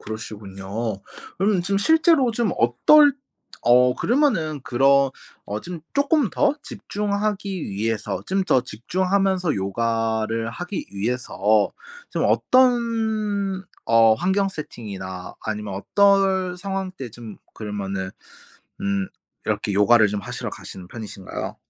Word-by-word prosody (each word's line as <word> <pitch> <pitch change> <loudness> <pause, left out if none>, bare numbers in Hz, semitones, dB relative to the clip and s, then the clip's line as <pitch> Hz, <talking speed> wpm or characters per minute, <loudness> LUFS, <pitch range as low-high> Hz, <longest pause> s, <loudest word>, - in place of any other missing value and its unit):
그러시군요. 105 0 -5 0.4
그럼 195 0 +2
좀 195 +3 0
실제로 320 +1 +4
좀 225 -4 0
어떨 285 - +6 0.5
어 125 +1 +5
그러면은 215 - +1
그런 140 0 +3 0.3
어 105 +1 -4
좀 175 +3 -7
쪼끔 285 - +2
더 290 -1 +2
집중하기 205 - -3
위해서 110 +2 -2
좀 190 0 0
더 130 - +3
집중하면서 185 - 0
요가를 115 +2 -1
하기 175 - -5
위해서 105 -1 +1 0.4
좀 - - -1
어떤 220 -6 +1 0.2
어 115 -1 +5
환경 190 - +1
세팅이나 100 - -7
아니면 105 -2 -4
어떨 190 - +2
상황 190 0 -3
때 130 -9 -8
좀 115 -2 -10 0.2
그러면은 100 -3 -4 0.7
음 100 -1 -1 0.4
이렇게 105 - -1
요가를 105 +2 +5
좀 105 0 -3
하시러 - - -5
가시는 90 -2 -10
편이신가요? 105 -4 -7
135 Hz, 250 characters per minute, -23 LUFS, -, 0.7 s, 어떨